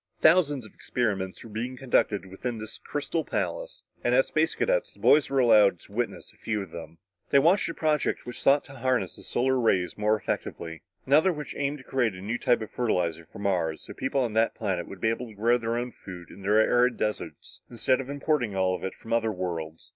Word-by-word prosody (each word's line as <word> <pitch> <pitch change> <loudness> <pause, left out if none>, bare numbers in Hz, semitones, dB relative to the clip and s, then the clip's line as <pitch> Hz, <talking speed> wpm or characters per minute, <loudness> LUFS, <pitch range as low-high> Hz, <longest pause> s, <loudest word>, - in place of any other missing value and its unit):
Thousands 150 -6 +4
of 110 - -14
experiments 100 -6 -2
were 115 - -11
being 120 +4 -4
conducted 120 -6 +1
within 110 +6 -5
this 110 0 -7
crystal 150 +2 -2
palace, - - -3 0.2
and - - +3
as - - +5
Space - - +1
Cadets, - - 0
the - - -21
boys 150 -1 +5
were 135 - -1
allowed 105 -7 +5
to - - -18
witness 120 +3 -3
a - - -26
few 110 -3 -2
of 95 - -12
them. 80 -1 -9 0.3
They - - +5
watched 170 +8 +4
a 165 - -5
project 155 -2 0
which 125 - -7
sought 140 +1 +4
to 140 - -13
harness 130 0 0
the - - -13
solar 130 +1 +1
rays 95 -5 +1
more 105 +1 +3
effectively; 80 -5 -4 0.2
another 155 +7 +5
which 150 -3 -6
aimed 145 +1 -1
to 135 - -13
create 125 -7 0
a - - -9
new 110 +5 -3
type 120 -2 +2
of 110 - -6
fertilizer 85 -9 -1
for - - -11
Mars, 90 -6 -1
so - - -9
people 130 0 0
of 115 - -4
that 110 +1 +2
planet 95 -6 -2
would 95 - -10
be 110 - +3
able 120 +2 -2
to 110 - -13
grow 120 +4 +3
their 115 0 -1
own 120 +1 -3
food 90 -5 -11
in 100 - -12
their 105 +3 +3
arid 120 +2 +3
deserts 105 0 -4
instead 130 +2 +1
of 135 - -9
importing 140 -5 0
it - - -6
all 95 -1 +1 0.2
from 115 - -5
other 115 -1 +2
worlds. 85 -4 -5
115 Hz, 220 wpm, -27 LUFS, 100-135 Hz, 0.3 s, as